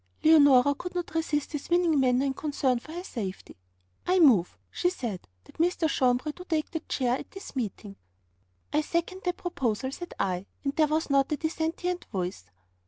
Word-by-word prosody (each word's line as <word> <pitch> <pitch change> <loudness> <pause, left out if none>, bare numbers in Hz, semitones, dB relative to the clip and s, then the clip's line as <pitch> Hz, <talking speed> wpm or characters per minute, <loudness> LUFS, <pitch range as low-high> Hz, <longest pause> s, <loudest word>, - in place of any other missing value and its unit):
Leonora 285 -4 +7
could 360 +5 -7
not 355 -2 -3
resist 310 -3 -1
his 295 -3 -5
winning 345 -4 +3
manner 255 0 +3
and 270 -1 -1
concern 270 -5 0
for 310 - -12
her 350 +2 -5
safety. 200 - -6 0.5
'I 365 +1 +3
move,' 225 - +5
she 355 - +1
said, 235 - -5 0.2
'that - - -19
Mr. 340 -1 +2
Jambres 255 +1 +1
do 360 - -9
take 320 -4 -1
the 320 - -2
chair 250 -2 +1
at - - -10
this 390 -5 -10
meeting.' 210 -4 -4 0.8
'I 300 - +3
second 340 +4 -2
that 360 0 0
proposal,' 260 -8 -2
said 350 +4 -8
I, 185 0 -1 0.2
and 275 -1 -2
there 310 -1 +4
was 310 0 -1
not 275 0 +3
a - - -1
dissentient 330 +3 -2
voice. 180 - -4
295 Hz, 180 wpm, -28 LUFS, 250-335 Hz, 0.8 s, Leonora